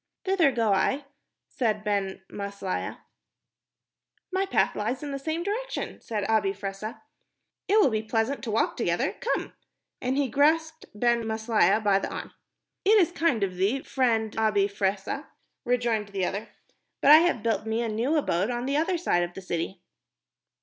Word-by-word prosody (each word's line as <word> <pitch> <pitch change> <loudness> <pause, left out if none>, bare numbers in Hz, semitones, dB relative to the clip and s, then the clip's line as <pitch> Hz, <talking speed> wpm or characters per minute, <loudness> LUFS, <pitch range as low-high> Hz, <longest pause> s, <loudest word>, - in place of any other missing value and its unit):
"Thither 370 -7 +3
go 230 -5 +2
I," 265 +9 +1 0.4
said 220 -5 -1
Ben 200 -2 -1
Maslia. 200 -2 -4 1.3
"My 385 +1 0
path - - +2
lies 235 +7 -2
in 290 - -4
the 275 - -3
same 315 +4 -2
direction," 450 +6 -4
said 210 -3 -3
Abi 215 -3 +2
Fressah. 200 +2 -6 0.6
"It 420 +3 +4
will 275 - +5
be 215 -1 0
pleasant 225 +5 -1
to - - -4
walk 220 - +1
together. - - 0
Come," 485 - -2 0.5
and 255 +2 0
he 285 -1 +2
grasped 315 +5 +1
Ben 235 +2 +2
Maslia 220 -2 +2
by 200 -2 +4
the - - -4
arm. - - -6 0.5
"It 425 +3 +6
is 355 -4 +4
kind 325 - +1
of 185 -2 -2
thee, 210 +9 +1
friend 225 -5 0
Abi 210 -3 +3
Fressah," 200 +7 -2 0.4
rejoined 235 -4 +1
the 195 -2 -2
other, 200 +4 -4 0.5
"but 280 - +6
I 305 - +12
have 325 -9 +2
built 225 -1 0
me 225 +2 0
a - - -1
new 230 +8 0
abode 200 - +1
on 240 0 -2
the 275 +2 0
other 340 +4 +1
side 250 - +1
of 175 0 -3
the - - -6
city." 175 +1 -3
225 Hz, 170 wpm, -27 LUFS, 205-285 Hz, 1.3 s, I